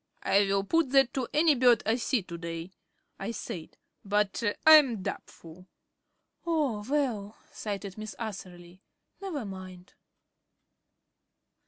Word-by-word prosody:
"I 195 - +4
will 195 0 +1
put 325 +7 +1
that 270 -2 +4
to 260 -3 -2
any 310 +1 +4
bird 245 -3 +4
I 220 +2 +2
see 245 -3 0
to 170 -1 -8
day," 170 +1 -6 0.5
I 195 - -4
said, 175 -7 -7 0.3
"but 205 +2 0 0.2
I 315 - +9
am 245 -10 +1
doubtful." 170 +1 -8 0.8
"Oh, 295 -11 0
well," 235 -8 -1
sighed 200 -2 -5
Miss 215 0 -7
Atherley, 185 -4 -8 0.4
"never 325 - -4
mind." 185 -2 -10
210 Hz, 125 wpm, -29 LUFS, 185-260 Hz, 0.8 s, I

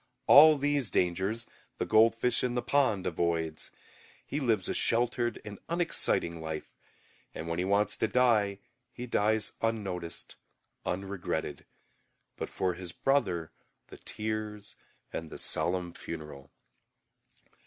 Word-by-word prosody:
All 155 +1 +9
these 140 -4 0
dangers 95 +7 0 0.3
the - - -1
goldfish 115 +2 +4
in 125 -1 0
the 125 - 0
pond 130 -8 +2
avoids; 80 -2 -1 0.5
he 145 - -3
lives 115 -9 +1
a - - -1
sheltered 120 0 +1
and 105 -2 -8
unexciting 165 - 0
life, 80 -1 -6 0.6
and 80 - -5
when 85 +1 -2
he 90 - 0
wants 100 +2 +2
to - - +1
die 110 -4 +3 0.3
he 125 - -7
dies 110 -2 +1
unnoticed, 95 -7 -3 0.5
unregretted, 95 0 -3 0.7
but - - -5
for 95 -1 -1
his 90 0 -6
brother 95 - 0 0.4
the - - -11
tears 105 -1 -4 0.4
and 80 -1 -4
the - - -8
solemn 90 -1 0
funeral. 75 -4 -8
105 Hz, 120 wpm, -30 LUFS, 85-120 Hz, 0.7 s, All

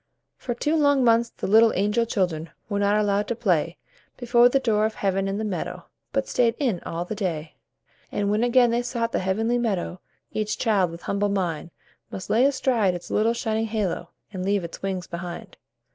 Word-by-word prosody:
For 240 - -4
two 300 +6 0
long 285 -3 +3
months 230 0 +4
the - - -7
little 220 +3 +6
angel 210 +4 +1
children 170 -6 -1 0.2
Were 205 -1 -1
not 205 +1 +3
allowed 205 0 +1
to 235 - -1
play 175 -7 0 0.4
Before 245 0 +4
the 275 - +2
door 220 -4 +2
of 220 - -8
Heaven 195 0 0
in 195 +1 -2
the 220 - -2
meadow, 200 -5 -4 0.3
But 275 0 -1
stayed 235 -2 +2
in 240 -11 0
all 170 +1 -4
the 200 - -4
day. 170 -7 -4 0.5
And 205 0 0
when 215 +2 +1
again 245 0 +4
they 235 +1 +1
sought 235 -1 -2
the - - 0
Heavenly 225 +6 0
Meadow 195 -6 -2 0.3
Each 215 0 -2
child 200 -6 +2
with 170 +1 -10
humble 205 +1 0
mind 175 -5 -2 0.4
Must 185 - -6
lay 235 +4 +4
aside 240 -9 +2
its 175 - -8
little 225 +2 +2
shining 225 -1 -1
halo, 205 -6 -2 0.2
And 185 -1 -4
leave 200 0 +1
its 170 - -8
wings 190 -2 -3
behind. 175 0 -7
210 Hz, 195 wpm, -24 LUFS, 185-235 Hz, 0.5 s, little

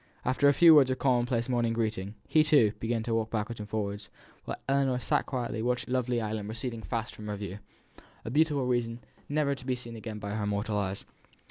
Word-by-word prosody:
After 130 +3 +3
a - - +4
few 170 -2 +8
words 140 -4 +7
of 130 - 0
common 125 -3 +2
place 120 -2 0
morning 120 -3 +1
greeting, 110 -3 -2
he, 155 -1 +5
too, 145 -9 +5
began 115 0 -1
to 115 - -2
walk 110 -1 0
backwards 110 +1 -3
and 105 0 -7
forwards, 100 -1 -3 0.4
while - - -4
Ellinor 135 -2 +2
sat 125 - 0
quietly 120 -4 -3
watching 125 +1 -1
the - - +1
lovely 125 -1 +1
island 105 -2 -3
receding 115 0 -4
fast 115 +4 -3
from 105 - -9
her 105 - -2
view 100 -1 -6 0.7
a 115 - -4
beautiful 145 -2 +2
vision 120 -1 -1 0.3
never 145 -1 +1
to 130 - -9
be 130 0 -1
seen 120 -2 -8
again 110 -1 -6
by 100 -1 -5
her 105 -1 -2
mortal 105 +1 -1
eyes. 95 -1 -3
115 Hz, 220 wpm, -29 LUFS, 110-130 Hz, 0.7 s, few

